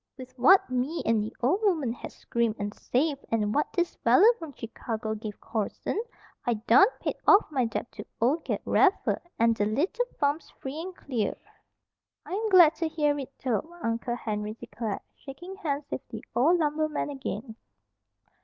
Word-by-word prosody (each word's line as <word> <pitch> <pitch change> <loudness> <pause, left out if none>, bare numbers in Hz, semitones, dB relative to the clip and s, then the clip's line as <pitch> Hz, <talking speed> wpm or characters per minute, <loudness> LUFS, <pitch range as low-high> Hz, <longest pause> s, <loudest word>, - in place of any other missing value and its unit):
With 255 -1 -10
what 375 +11 +6
me 255 +6 -1
and 225 -1 +3
the 215 +2 -4
ol' 310 +11 +3
woman 320 - +1
had - - -8
scrimped 235 -2 -1
and 205 0 -3
saved, 280 +4 -1
an' 210 -2 +1
what 295 +6 0
this 350 -2 -1
feller 455 +4 +6
from 325 -3 -7
Chicago 225 -2 -4
give 215 -1 -7
Corson, 220 - -3 0.4
I 240 - +1
done 215 - +6
paid - - -2
off 405 - +7
my 260 -4 +1
debt 225 +1 -4
to - - -9
ol' 255 +7 +3
Ged - - -3
Raffer, 395 -1 +3 0.2
an' 230 0 +4
the 205 -2 0
little 360 - 0
farm's 290 +2 0
free 275 +4 -7
and 370 +1 -7
clear." 245 -10 -2 0.9
"I'm 435 +4 -2
glad 350 -5 +8
to 330 - 0
hear 295 -2 +1
it, 275 -1 -6
Tobe," 255 +3 -1 0.2
Uncle 230 +1 -1
Henry 210 -2 -4
declared, 215 -1 -5
shaking 325 +7 -10
hands 295 -6 -2
with - - -3
the - - -7
old 320 +8 +4
lumberman 310 -1 0
again. 250 -4 -5
270 Hz, 170 wpm, -28 LUFS, 230-320 Hz, 0.9 s, glad